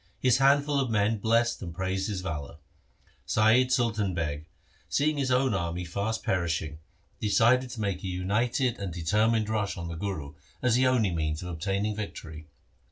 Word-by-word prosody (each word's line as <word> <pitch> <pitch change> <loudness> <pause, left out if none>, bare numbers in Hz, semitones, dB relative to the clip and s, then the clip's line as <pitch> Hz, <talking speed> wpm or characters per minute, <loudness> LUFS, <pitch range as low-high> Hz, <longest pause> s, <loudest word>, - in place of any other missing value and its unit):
His 130 -1 +3
handful 140 +1 +4
of 130 -3 0
men 110 0 +1
blessed 115 +3 +1
and 85 -4 -6
praised 95 +1 -2
his 95 -3 -3
valour. 80 -3 -5 0.7
Saiyid 120 +4 +4
Sultan 110 -7 +1
Beg, 75 -2 -3 0.4
seeing 150 +1 +1
his 135 -2 0
own 130 -1 +2
army 85 -1 -2
fast 100 +6 -2
perishing, 80 -4 -1 0.4
decided 120 +4 +3
to 115 -2 -6
make 100 -3 -2
a - - -3
united 115 +7 0
and 100 -3 -4
THE 85 +1 -6
SIKH 80 +3 -2
RELIGION 110 +2 +4
determined 110 -1 -2
rush 105 -3 -1
on 85 -1 -5
the 85 - -5
Guru, 80 -6 -4 0.3
as 125 -2 +3
the 130 +2 +4
only 120 -7 +2
means 80 -1 -2
of 90 - -5
obtaining 100 +5 -2
victory. 80 -7 -7
100 Hz, 180 wpm, -28 LUFS, 85-120 Hz, 0.7 s, handful